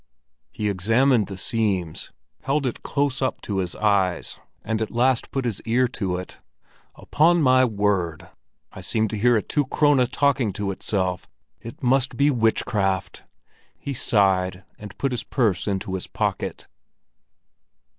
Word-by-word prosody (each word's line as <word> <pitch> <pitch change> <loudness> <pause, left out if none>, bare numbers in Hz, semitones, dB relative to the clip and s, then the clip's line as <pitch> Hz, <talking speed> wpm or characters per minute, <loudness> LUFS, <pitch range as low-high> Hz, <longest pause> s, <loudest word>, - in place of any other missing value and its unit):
He 105 - -3
examined 115 +4 +2
the 95 - -7
seams, 95 -6 -1 0.3
held 140 +1 0
it 125 - -3
close 140 -2 -1
up 130 - -1
to 100 -2 -3
his 90 -2 -3
eyes, 100 -4 0 0.2
and 110 0 -2
at 110 - -1
last 125 +1 +1
put 135 -2 -2
his 115 -5 -2
ear 125 +3 +2
to 95 -7 -2
it. 90 - -9 0.6
"Upon 170 +3 +2
my 130 -3 +5
word, 100 -7 -1 0.4
I - - -10
seem 110 -1 0
to 110 - -4
hear 120 +3 +3
a 105 - -1
two 145 -3 -1
krone 145 -2 +3
talking 135 -5 +1
to 100 0 -2
itself. 95 -2 -2 0.3
It 115 +3 -11
must 130 0 +2
be 145 +1 +4
witchcraft!" 110 -5 0 0.5
He 140 - -5
sighed 95 -5 +1 0.2
and 105 -1 -10
put 135 - -1
his 125 - -3
purse 110 -9 0
into 95 -1 -2
his 95 - -4
pocket. - - -3
110 Hz, 150 wpm, -23 LUFS, 95-130 Hz, 0.6 s, my